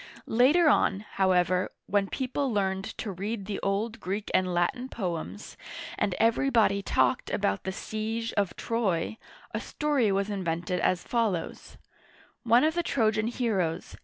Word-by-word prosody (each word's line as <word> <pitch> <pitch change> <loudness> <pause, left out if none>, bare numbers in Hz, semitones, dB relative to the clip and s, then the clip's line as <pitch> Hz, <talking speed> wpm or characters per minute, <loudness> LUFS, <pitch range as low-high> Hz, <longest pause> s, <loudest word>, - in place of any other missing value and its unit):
Later 285 +9 +4
on, 195 -8 +3
however, 185 -3 +1
when 200 -1 +1
people 265 +1 -1
learned 195 -2 0
to 215 - -4
read 200 +3 -4
the 200 0 -3
old 215 +4 -1
Greek 200 +2 -4
and 185 -1 +2
Latin 175 +9 0
poems, 170 - -5 0.4
and 195 -3 0
everybody 230 -3 +3
talked - - +1
about 100 0 -1
the 190 - -1
siege 220 +3 -3
of 200 -3 0
Troy, 220 -3 -1 0.3
a - - -1
story 285 -8 0
was 195 +1 +1
invented 180 -2 -2
as 180 -1 +1
follows: 220 -8 -2 0.6
One 235 +2 +4
of 315 +1 +3
the 345 - +1
Trojan 220 -8 +1
heroes. 195 -9 -1
205 Hz, 140 wpm, -28 LUFS, 185-230 Hz, 0.6 s, Later